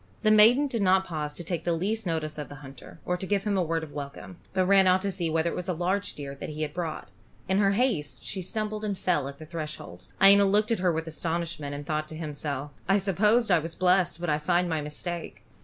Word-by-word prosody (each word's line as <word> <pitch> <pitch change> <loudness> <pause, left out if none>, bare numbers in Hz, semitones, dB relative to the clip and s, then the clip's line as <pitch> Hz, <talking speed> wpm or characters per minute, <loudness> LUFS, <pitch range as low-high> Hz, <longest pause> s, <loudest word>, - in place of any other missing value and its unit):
The 215 - +5
maiden 225 +7 +6
did 240 -6 -2
not 190 0 +4
pause 150 -4 -4
to 175 - -6
take 165 -1 -3
the 170 - +1
least 200 +5 -2
notice 155 -2 -2
of 150 - -6
the 145 - -9
hunter, 135 +4 -12
or 180 - 0
to 190 - -5
give 200 -1 +1
him 210 -2 0
a 190 - +2
word 165 -1 -1
of 155 - -8
welcome, 145 +5 -7
but 185 - +1
ran 195 0 +5
out 185 +1 +4
to 200 - 0
see 175 -3 -2
whether 160 +1 +1
it - - -5
was 180 +1 -4
a 180 - 0
large 185 +4 -1
deer 140 -2 -6
that 140 - -7
he 155 0 -4
had 145 -1 -4
brought. 165 -8 -4 0.4
In 190 +1 +2
her 200 -1 +3
haste 175 - 0
she 190 - -4
stumbled 215 +3 -3
and 205 -2 -2
fell 150 -8 0
at 140 0 -8
the 155 - -10
threshold. 150 - -7
Iena 200 +1 +7
looked 210 +3 +2
at 230 - +1
her 180 -1 +2
with 160 0 -2
astonishment, 160 -3 -3
and 145 0 -7
thought 155 0 -2
to 155 - -9
himself, 145 -2 -4 0.2
"I 195 - +5
supposed 210 +4 +2
I 175 - +6
was 165 +1 -5
blessed, 180 -2 +2
but 175 -2 -1
I 150 - +1
find 175 +3 +1
my 160 -2 -1
mistake. 165 +3 -5
175 Hz, 255 wpm, -27 LUFS, 155-195 Hz, 0.4 s, Iena